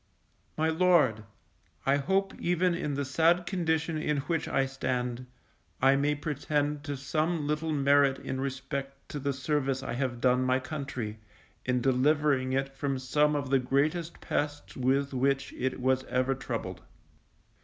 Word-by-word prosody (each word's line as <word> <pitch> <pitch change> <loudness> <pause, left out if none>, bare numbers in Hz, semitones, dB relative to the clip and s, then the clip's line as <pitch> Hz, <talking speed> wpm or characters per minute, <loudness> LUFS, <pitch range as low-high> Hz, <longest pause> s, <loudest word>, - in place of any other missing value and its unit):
_My 160 +1 +1
Lord, 155 - +3 0.6
I 135 +1 +4
hope 195 +7 0
even 180 +1 +2
in 150 -4 -2
the 140 0 -1
sad 165 +6 +3
condition 160 -3 0
in 150 -1 0
which 165 +4 -2
I 135 - +1
stand, 125 -2 -3 0.5
I 135 +1 +5
may 145 +2 +1
pretend 150 -1 -1
to 145 -2 -3
some 155 +3 -1
little 150 +2 -1
merit 140 -1 +4
in 130 0 -4
respect 135 0 -4
to 145 - -4
the 140 +1 -1
service 135 -1 -1
I - - -3
have 125 -1 -2
done 125 +1 +3
my 130 0 +3
country, 130 -6 -5 0.5
in 125 -1 +1
delivering 135 +1 +2
it 135 +1 -1
from 135 -1 -1
some 150 +3 +2
of 140 -2 -2
the 135 - +5
greatest 150 +6 0
pests 145 0 -3
with 135 +2 +1
which 135 +1 0
it 130 0 -2
was 130 +1 +2
ever 130 +1 +1
troubled. 115 -8 -5
140 Hz, 155 wpm, -29 LUFS, 130-150 Hz, 0.6 s, I